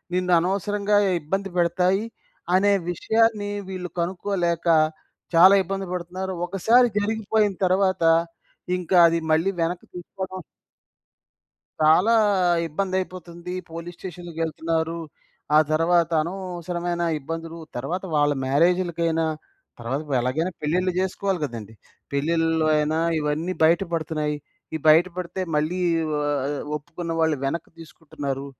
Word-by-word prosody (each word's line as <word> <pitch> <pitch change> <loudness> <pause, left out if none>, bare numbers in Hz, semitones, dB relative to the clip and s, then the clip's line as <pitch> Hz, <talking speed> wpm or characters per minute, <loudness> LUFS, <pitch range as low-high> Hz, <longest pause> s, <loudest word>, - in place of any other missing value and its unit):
నిన్ను 180 0 0
అనవసరంగా 200 +3 0 0.2
ఇబ్బంది 195 +6 -2
పెడతాయి 180 +3 +2 0.5
అనే 200 +2 +4 0.2
విషయాన్ని 220 +2 +1 0.2
వీళ్ళు 180 -1 -5
కనుక్కోలేక 175 -1 -1 0.7
చాలా 185 +4 +8
ఇబ్బంది 195 +2 -4
పడుతున్నారు. 180 +2 -4
ఒకసారి 220 +7 +4
జరిగిపోయిన 215 0 0
తర్వాత, 185 -1 +2 0.7
ఇంకా 180 0 +1
అది 165 0 +1
మళ్ళీ 165 +5 +3
వెనక్కి 170 +2 -2
తీసుకోడం 185 +1 -6 1.4
చాలా 170 +9 +5 0.5
ఇబ్బందైపోతుంది. 180 0 -4 0.2
పోలీస్ 170 +1 -7
స్టేషన్‌కేళ్తున్నారు. 165 -2 -3 0.6
ఆ - - +8
తర్వాత, 170 +1 +3
అనవసరమైన 175 -1 -4 0.2
ఇబ్బందులు 165 +3 -6 0.2
తరువాత 165 +10 -3
వాళ్ళ 145 0 +3
మ్యారేజ్‌లకైనా 170 +2 +2 0.5
తర్వాత 120 +4 -3
ఇప్పుడెలాగైనా 140 +5 0
పెళ్ళిళ్ళు 180 +5 +1
జేసుకోవాలి 190 0 -1
గదండీ! 115 -5 -7 0.4
పెళ్లిలో 165 +2 +1
అయినా 150 +1 +1 0.2
ఇవన్నీ 155 +4 -1
బయట 165 +3 +4
పడుతున్నాయి. 155 -2 -1 0.4
ఈ - - +1
బయట 160 +3 +7
పడితే 180 +1 -4 0.2
మళ్ళీ 155 +5 0 0.4
ఆహ్, 145 -1 -1 0.2
ఒప్పుకున్న 165 +3 -6
వాళ్ళు 160 -2 +2
వెనక్కి 150 +4 -3
తీసుకుంటున్నారు. 145 -4 -6
170 Hz, 105 wpm, -24 LUFS, 160-185 Hz, 1.4 s, చాలా